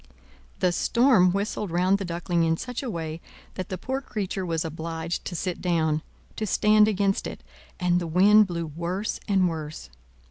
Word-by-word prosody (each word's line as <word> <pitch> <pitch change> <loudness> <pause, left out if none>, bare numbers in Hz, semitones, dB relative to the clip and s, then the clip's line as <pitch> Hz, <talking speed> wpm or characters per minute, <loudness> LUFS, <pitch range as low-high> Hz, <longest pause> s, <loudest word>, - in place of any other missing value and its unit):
The 180 - +3
storm 230 -2 +4
whistled 200 +1 -2
round 180 +3 +2
the 195 - -3
Duckling 170 0 -1
in 165 0 +2
such 250 +5 -5
a 265 - -4
way 165 -4 -4 0.3
that 185 - -5
the 185 - -3
poor 265 +8 -3
creature 200 -6 -3
was 165 -1 -1
obliged 165 +1 -4
to 175 - -4
sit 180 +1 -3
down, 160 -3 +1 0.4
to 215 - -2
stand 210 +2 +4
against 200 -2 +1
it; - - -8 0.4
and 180 -1 +2
the 170 - -3
wind 200 +5 +6
blew 170 -2 -3
worse 170 +7 -3
and 190 -3 +3
worse. 155 - -6
180 Hz, 175 wpm, -26 LUFS, 165-200 Hz, 0.4 s, wind